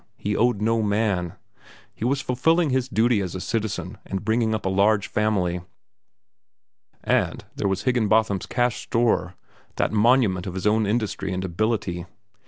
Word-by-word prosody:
He 105 0 -2
owed 115 -2 +1
no 115 +1 +2
man. 100 -5 0 0.6
He - - -8
was 135 +3 +1
fulfilling 155 +5 +2
his 130 0 0
duty 115 -2 +2
as 95 -2 -4
a - - -3
citizen 110 +1 -3
and 95 +1 -5
bringing 110 0 +1
up 110 - -5
a - - +1
large 100 +1 +2
family. 95 -5 0 1.4
And - - 0
there - - -1
was 95 -1 -1
Higginbotham's 110 -5 +1
Cash 120 -2 0
Store, 110 -6 0 0.4
that - - 0
monument 110 -4 +3
of 90 - -5
his 95 - -4
own 105 0 +3
industry 105 -3 -1
and 95 0 -2
ability. 90 -2 -2
110 Hz, 155 wpm, -24 LUFS, 95-115 Hz, 1.4 s, monument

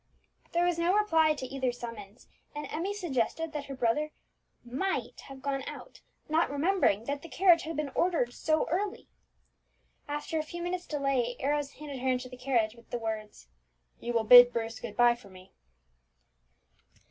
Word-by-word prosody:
There 345 +1 +3
was 350 -1 +1
no 350 +3 +2
reply 325 -7 +3
to 265 - -5
either 260 -1 -1
summons, 230 -3 -9 0.3
and 295 0 -4
Emmie 345 +6 -2
suggested 325 - -2
that 295 -2 -4
her 275 -1 -7
brother 260 +5 +1 0.6
might 270 +11 -3
have 270 -1 -11
gone 275 -1 -1
out, - - -9 0.3
not 320 +2 +2
remembering 285 - +2
that 280 +3 -3
the 335 - -10
carriage 350 -2 +5
had 325 -2 -5
been 300 -3 -2
ordered 330 -9 +1
so 310 0 0
early. 395 +4 -2 1.0
After 295 +2 -3
a - - -1
few 345 +3 -7
minutes' 355 0 -3
delay, 275 -5 0
Arrows 290 0 -1
handed 285 -3 -8
her 260 +1 0
into 255 0 -1
the 250 - -9
carriage, 245 -4 0
with 235 -1 -19
the - - -2
words, 215 - -5 0.5
"You 240 - -4
will 230 -1 +2
bid 245 +2 +10
Bruce 225 -1 -3
good 220 -3 -8
bye 240 0 +6
for 235 -4 -14
me." 185 0 -15
275 Hz, 170 wpm, -30 LUFS, 240-325 Hz, 1.0 s, bid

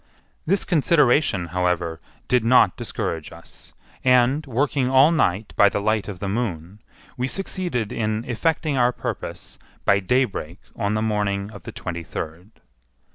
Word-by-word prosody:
This 195 +4 +1
consideration, 145 - +2
however, 90 -2 -1 0.3
did 125 -2 +2
not 125 +3 +5
discourage 80 -2 -4
us; - - -14 0.3
and, 125 +3 +4
working 135 +1 0
all 135 +4 +6
night 105 - 0
by 100 - +6
the 100 - -2
light 110 0 0
of 100 -3 -6
the 100 - -4
moon, 95 -3 -3 0.4
we 125 +1 -1
succeeded 175 - -2
in 110 +1 -2
effecting 145 +3 0
our 120 0 +4
purpose - - -6 0.3
by 100 - +4
daybreak 100 -5 -1 0.2
on 105 -1 -1
the 110 - 0
morning 105 -2 -1
of 100 -5 -12
the - - -6
twenty 85 -1 -5
third. 80 +4 -7
110 Hz, 145 wpm, -23 LUFS, 95-130 Hz, 0.4 s, all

